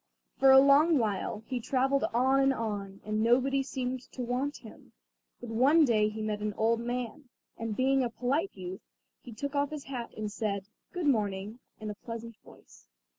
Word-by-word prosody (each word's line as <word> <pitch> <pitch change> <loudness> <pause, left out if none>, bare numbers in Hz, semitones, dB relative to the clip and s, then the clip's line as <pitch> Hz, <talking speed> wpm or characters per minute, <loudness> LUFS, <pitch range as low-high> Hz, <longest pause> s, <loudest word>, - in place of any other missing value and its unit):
For 270 - +6
a 265 - +9
long 285 +4 +6
while 215 -2 -2
he 255 0 -3
travelled 270 +3 +1
on 260 +3 +3
and 270 0 +4
on, 205 -5 -4
and 215 0 -1
nobody 260 +4 +3
seemed 260 -2 -3
to 255 - -4
want 255 +4 -2
him; - - -15 0.5
but 240 -2 -8
one 280 +8 +5
day 215 -4 +3
he 215 0 -5
met 210 -1 -2
an 210 -1 -2
old 225 +1 +2
man, 245 +3 -4 0.3
and 225 -2 -4
being 265 +2 +2
a 245 - -1
polite 270 +10 -1
youth, 185 0 -7 0.4
he 245 - -11
took 280 +6 -5
off 285 0 +1
his 300 -2 -6
hat 255 -4 -6
and 215 -1 -3
said: 200 -3 -2 0.3
"Good 355 -3 -3
morning," 210 -3 0 0.2
in 215 -1 -5
a - - -5
pleasant 230 +2 -8
voice. - - -19
240 Hz, 185 wpm, -30 LUFS, 215-270 Hz, 0.5 s, a